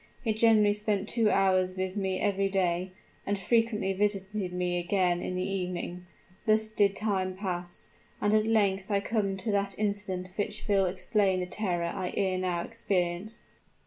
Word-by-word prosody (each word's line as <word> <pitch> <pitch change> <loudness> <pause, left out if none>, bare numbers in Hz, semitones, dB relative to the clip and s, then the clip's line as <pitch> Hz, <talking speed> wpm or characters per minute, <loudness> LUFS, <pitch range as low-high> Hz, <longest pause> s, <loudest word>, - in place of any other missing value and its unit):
He 220 - +1
generally 215 -2 +5
spent 210 -1 -1
two 225 -2 +2
hours 185 -2 +2
with 185 0 -2
me 190 -2 -1
every 195 -1 +1
day, 185 -1 0 0.3
and 205 - -1
frequently 215 0 +1
visited 200 -1 -1
me 180 0 -1
again 175 -1 +1
in 185 - -3
the 185 +1 -1
evening. 180 -2 -4 0.4
Thus 215 0 +4
did 205 -2 +2
time 190 -3 -1
pass; 180 -3 -2 0.3
and 205 0 +1
at 215 0 +3
length 200 -3 +2
I 200 -1 +2
come 200 -2 -1
to 205 +3 -1
that 200 -1 0
incident 200 -3 -2
which 210 +1 -3
will 195 -2 +3
explain 190 +1 +1
the 180 - -1
terror 180 -3 -2
I 185 -2 -3
ere 190 -2 +1
now 180 -2 -1
experienced." 190 -1 -2
195 Hz, 165 wpm, -29 LUFS, 185-210 Hz, 0.4 s, generally